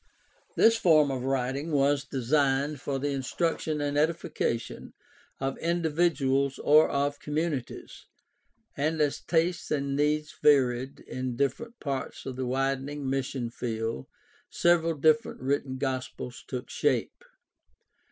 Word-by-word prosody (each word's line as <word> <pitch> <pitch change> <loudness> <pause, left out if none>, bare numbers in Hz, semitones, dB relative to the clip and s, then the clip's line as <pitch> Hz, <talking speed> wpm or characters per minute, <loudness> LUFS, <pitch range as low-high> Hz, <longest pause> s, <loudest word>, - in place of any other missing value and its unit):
This 230 0 +5
form 155 -8 +4
of 130 -2 -3
writing 135 +4 -1
was 140 0 +2
designed 140 +1 0
for 140 -1 -2
the 145 +2 -1
instruction 155 +3 -1
and 145 0 0
edification 155 -7 -2 0.5
of 135 0 -3
individuals 160 -5 +1
or 155 +2 +5
of 140 +1 -1
communi 150 -3 -1
ties, - - -12 0.7
and 155 +3 0
as 150 -2 +1
tastes 170 0 0
and 140 -2 -1
needs 150 +1 0
varied 130 -2 +3
in 130 -1 -4
different 230 - -2
parts 135 -2 -4
of 130 - -5
the 130 0 -3
widening 135 +2 -1
mission 135 -3 -2
field 115 - -3 0.4
several 165 -1 +2
different 155 +1 +2
written 135 0 -1
gospels 130 -3 -4
took 125 -1 -5
shape. - - 0
140 Hz, 125 wpm, -28 LUFS, 130-155 Hz, 0.7 s, This